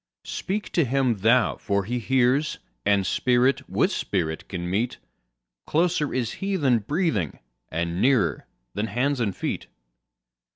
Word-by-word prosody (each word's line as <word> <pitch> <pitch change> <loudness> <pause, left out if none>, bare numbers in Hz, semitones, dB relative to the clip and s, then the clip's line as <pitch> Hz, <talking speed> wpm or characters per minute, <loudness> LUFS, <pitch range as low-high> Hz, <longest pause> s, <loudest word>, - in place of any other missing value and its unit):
Speak 200 +1 -3
to 170 - +3
Him 130 -4 +1
thou 115 +4 +3
for 100 -2 0
He 120 +5 -2
hears, 130 +6 +2 0.3
and 100 -2 +3
Spirit 125 +6 +2
with - - +2
Spirit 80 -5 -2
can 90 -2 -4
meet—Closer 100 - -2
is 120 -3 -1
He 195 0 0
than 135 -9 +3
breathing, 110 - -1 0.3
and 85 +2 -2
nearer 130 -3 +2 0.3
than 105 - -2
hands 130 +5 0
and 105 -5 0
feet. - - -3
120 Hz, 130 wpm, -25 LUFS, 95-140 Hz, 0.3 s, to